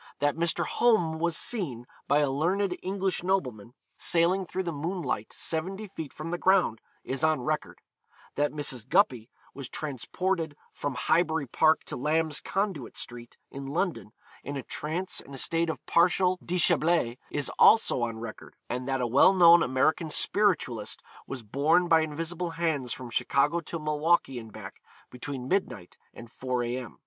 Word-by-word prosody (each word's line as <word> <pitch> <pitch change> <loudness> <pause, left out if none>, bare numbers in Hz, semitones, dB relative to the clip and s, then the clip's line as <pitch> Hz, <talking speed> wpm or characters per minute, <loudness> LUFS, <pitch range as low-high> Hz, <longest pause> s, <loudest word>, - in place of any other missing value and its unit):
That 145 0 +1
Mr. 170 0 0
Home 175 -10 +2
was 170 0 +1
seen, 145 - -2 0.2
by 145 +1 +3
a 145 - +2
learned 180 +7 0
English 190 0 -2
nobleman, 130 - -2 0.2
sailing 175 +2 +2
through 190 +2 -3
the 170 - -3
moonlight 155 - -3
seventy 190 +6 -3
feet 160 -7 -8
from 155 +2 -7
the 175 - -2
ground, 185 - +3 0.2
is 135 +3 -3
on 155 -4 +2
record; 155 +3 -3 0.5
that 145 0 0
Mrs. 130 -5 -3
Guppy 130 - +2 0.2
was 135 -3 -7
transported 160 +3 -3 0.2
from 145 -3 -4
Highbury 160 +1 +1
Park 155 +5 +3
to - - -6
Lamb's 155 +3 +1
Conduit 195 - -3
Street, 120 -1 -8
in 135 0 -7
London, 165 - -2 0.3
in 140 +1 -5
a 135 - -5
trance 170 +5 -3
and 140 - -11
a - - -7
state 165 +4 +1
of 160 - -5
partial 180 +2 +3
déshabille, 170 -7 +2
is 145 -1 -2
also 220 - +6
on 115 -1 -2
record; 110 -1 -9
and 125 +1 -4
that 135 -1 0
a - - +1
well 135 +10 +5
known 170 -2 +7
American 155 +5 +1
spiritualist 150 - 0 0.2
was 130 -3 -6
borne 155 - +2
by 165 -1 +5
invisible 165 +3 -3
hands 150 -7 -1
from 125 -1 -6
Chicago 145 +7 +1
to 165 0 -6
Milwaukee 150 -3 +1
and 110 -1 -11
back, 100 -3 -10 0.3
between 125 0 -6
midnight 125 - -2 0.2
and 120 -1 -12
4 125 -2 -2
A.M. 120 0 -5
155 Hz, 160 wpm, -28 LUFS, 130-175 Hz, 0.5 s, known